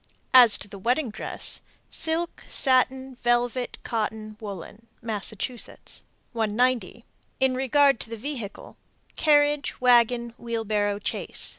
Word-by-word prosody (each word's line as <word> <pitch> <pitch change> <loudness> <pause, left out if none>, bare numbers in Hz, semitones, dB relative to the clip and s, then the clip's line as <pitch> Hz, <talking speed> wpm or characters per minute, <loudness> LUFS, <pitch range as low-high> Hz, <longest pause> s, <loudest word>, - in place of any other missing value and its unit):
As 245 -4 +8
to - - -6
the 200 -1 -10
wedding 245 +4 0
dress: - - -5 0.3
Silk, 325 +2 0
satin, 260 0 +2
velvet, 245 0 0
cotton, 215 -1 -3
woolen. 205 +1 -9
Massachusetts. 220 +2 -4 0.3
190. 230 0 0 0.3
In 265 -1 +3
regard 270 0 +3
to - - -6
the 230 - -6
vehicle: 235 -4 -7 0.4
Carriage, 290 -1 +2
wagon, 240 -1 +3
wheelbarrow, 215 -3 -1
chaise. - - 0
240 Hz, 110 wpm, -25 LUFS, 220-260 Hz, 0.4 s, As